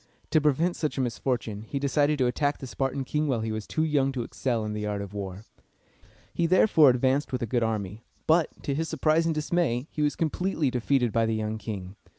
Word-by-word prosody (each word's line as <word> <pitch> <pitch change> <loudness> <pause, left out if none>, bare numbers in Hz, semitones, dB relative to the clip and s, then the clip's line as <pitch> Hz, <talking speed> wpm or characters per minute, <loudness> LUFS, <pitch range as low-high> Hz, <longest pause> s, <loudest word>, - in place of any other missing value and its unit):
To 155 - +4
prevent 155 +4 +2
such 155 -2 -2
a - - +1
misfortune, 120 -3 -2
he 115 +6 -5
decided 145 +2 +2
to 130 - +2
attack 145 +4 0
the - - -8
Spartan 135 +1 -2
king 150 +3 -1
while 125 -5 0
he 110 0 -2
was 110 -1 -4
too 155 - 0
young 145 -4 +2
to 125 -3 -2
excel 115 -2 -2
in 105 - -3
the 105 0 -3
art 105 -1 -2
of 100 0 -7
war. 100 0 -6 0.9
He 170 - +1
therefore 165 -4 +6
advanced 130 +3 +1
with 125 -1 -2
a - - +1
good 120 +2 0
army; 110 -1 -2 0.2
but, 160 0 +4 0.2
to 140 - -1
his 160 +3 -2
surprise 160 +1 +2
and 165 - 0
dismay, 155 -5 0
he 150 - -3
was 150 -1 +1
completely 165 -3 0
defeated 125 -1 +1
by 115 0 +2
the 110 - 0
young 110 0 -2
king. 100 -3 -6
130 Hz, 220 wpm, -27 LUFS, 110-150 Hz, 0.9 s, therefore